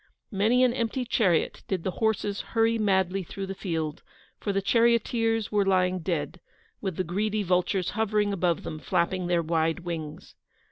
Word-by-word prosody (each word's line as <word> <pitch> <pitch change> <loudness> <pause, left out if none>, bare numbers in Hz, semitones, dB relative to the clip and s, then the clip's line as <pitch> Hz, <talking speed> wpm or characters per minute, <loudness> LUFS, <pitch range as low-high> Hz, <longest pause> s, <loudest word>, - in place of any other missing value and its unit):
Many 225 +5 +3
an 250 -2 +3
empty 245 +1 -1
chariot 195 -8 +1
did 185 -4 -2
the 190 - -1
horses 210 -2 0
hurry 225 0 +1
madly 190 -2 +1
through 195 +2 -6
the 195 - -5
field, 165 -5 -3 0.4
for 205 - -2
the 195 - +1
charioteers 230 0 +2
were 205 -1 +3
lying 185 -1 +2
dead, 170 0 -3 0.4
with 190 -4 -3
the 185 - -1
greedy 210 +4 -1
vultures 180 0 +1
hovering 210 -2 +1
above 175 -3 0
them, 155 - -6
flapping 175 +5 0
their 175 -1 +2
wide 165 +1 0
wings. 160 -3 -6
195 Hz, 160 wpm, -27 LUFS, 175-215 Hz, 0.4 s, Many